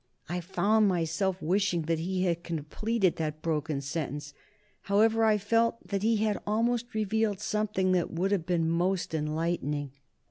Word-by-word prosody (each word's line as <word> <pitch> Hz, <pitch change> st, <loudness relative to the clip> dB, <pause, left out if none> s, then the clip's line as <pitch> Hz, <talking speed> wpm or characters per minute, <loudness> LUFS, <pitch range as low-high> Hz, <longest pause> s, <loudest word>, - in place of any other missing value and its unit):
I 175 Hz, +3 st, -2 dB
found 200 Hz, +5 st, +2 dB
myself 180 Hz, +1 st, 0 dB
wishing 180 Hz, 0 st, +1 dB
that 165 Hz, +1 st, 0 dB
he 185 Hz, +2 st, -1 dB
had 170 Hz, -2 st, 0 dB
completed 180 Hz, +5 st, -1 dB
that 155 Hz, -1 st, -3 dB
broken 155 Hz, -3 st, -1 dB
sentence, 145 Hz, 0 st, -4 dB, 0.6 s
however; 220 Hz, +3 st, +4 dB
I 215 Hz, -1 st, +4 dB
felt 230 Hz, 0 st, +1 dB
that 200 Hz, -1 st, -1 dB
he 225 Hz, +1 st, +2 dB
had 210 Hz, -1 st, 0 dB
almost 235 Hz, +2 st, 0 dB
revealed 215 Hz, -1 st, 0 dB
something 210 Hz, -3 st, 0 dB
that 180 Hz, -2 st, +1 dB
would 185 Hz, +4 st, -1 dB
have 180 Hz, -5 st, 0 dB
been 170 Hz, -3 st, +1 dB
most 175 Hz, +2 st, 0 dB
enlightening. 150 Hz, -2 st, -1 dB
185 Hz, 150 wpm, -29 LUFS, 165-210 Hz, 0.6 s, however